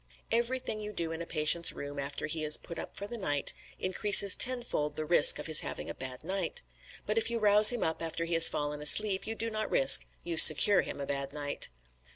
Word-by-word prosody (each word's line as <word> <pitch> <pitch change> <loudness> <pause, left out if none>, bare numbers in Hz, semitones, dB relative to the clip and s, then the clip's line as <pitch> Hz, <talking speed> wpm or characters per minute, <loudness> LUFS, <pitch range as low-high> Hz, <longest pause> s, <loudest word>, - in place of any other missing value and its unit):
"Everything 235 -1 -4
you 210 0 -9
do 165 -4 -6
in 165 0 -9
a 170 - -10
patient's 160 +1 +1
room 145 0 -10
after 140 0 -8
he 155 0 -6
is 150 0 +5
'put 170 -1 -12
up' - - -11
for 200 - -7
the 235 +3 -9
night 145 -7 -3 0.2
increases 200 +1 +3
tenfold 240 - -2
the 155 0 -7
risk 170 +3 +3
of - - -10
his 160 -1 +2
having - - -8
a - - -10
bad 130 -1 -11
night; 195 - -6 0.4
but 215 +1 -3
if 225 - -2
you 235 - -5
rouse 210 -1 +6
him 245 -2 -4
up 160 0 -5
after 165 0 -6
he 170 - -7
has 165 0 +5
fallen 150 0 -7
asleep, 195 +6 +3
you 225 - -5
do 230 0 -7
not 215 0 -6
risk - - +3 0.2
you 170 -1 -7
secure 170 +6 +8
him - - -10
a 140 - -7
bad 140 0 -7
night." 145 -1 -4
170 Hz, 225 wpm, -27 LUFS, 150-215 Hz, 0.4 s, secure